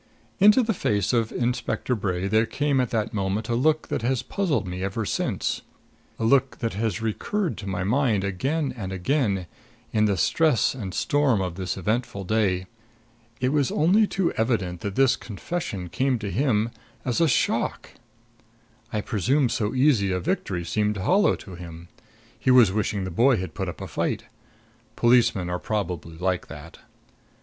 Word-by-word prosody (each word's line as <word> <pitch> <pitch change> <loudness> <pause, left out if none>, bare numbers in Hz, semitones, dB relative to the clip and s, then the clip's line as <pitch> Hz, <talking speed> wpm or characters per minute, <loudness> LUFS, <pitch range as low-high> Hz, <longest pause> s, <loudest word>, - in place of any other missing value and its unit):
Into 210 +6 +6
the 225 0 0
face 105 - 0
of 115 -2 +1
Inspector 125 +1 -1
Bray 95 -4 -1
there 110 +3 +2
came 145 -2 +1
at 125 - -1
that 115 -1 -1
moment 100 +2 -2
a - - +1
look 155 +5 +1
that - - -1
has 125 +1 0
puzzling 150 - -1
me 90 +1 -4
ever 100 +3 -2
since - - -1 0.6
a - - -4
look 135 +2 +3
that 115 - -2
has 110 +1 -2
recurred 175 - -1
to 100 - -7
my 90 -2 -2
mind 110 -1 +1
again 135 - -1
and 95 -6 -5
again, 100 -1 0 0.5
in 110 -1 +3
the 100 -2 +1
stress 150 - +2
and 100 -8 -6
storm 145 -7 +2
of 90 -2 -2
this 95 +1 -4
eventful 105 +1 -2
day. 95 -3 +1 0.7
It 130 - +1
was 140 -2 +1
only 200 +7 +4
too 190 -4 0
evident 100 -7 -1
that 100 -1 -4
this 135 -2 +4
confession 105 - -5
came 130 +8 0
to 105 -3 -5
him 115 -4 +1 0.3
as 125 +4 0
a 165 - +5
shock. 130 - 0 1.0
I 105 - -1
presume 125 - +1
so 110 +2 -1
easy 125 -8 +3
a 90 - 0
victory 90 0 -2
seemed 105 +3 0
hollow 185 - +3
to 95 - -11
him; 85 -1 -10 0.5
he - - 0
was 125 -6 +7
wishing 100 -1 -1
the 95 - -4
boy 120 +8 +4
had 90 -3 -5
put - - -3
up - - -8
a - - -5
fight. - - -2 0.7
Policemen 120 -6 +3
are 90 0 -2
probably 90 -6 -3
like 90 0 -1
that. 75 +3 -11
110 Hz, 170 wpm, -25 LUFS, 95-130 Hz, 1.0 s, was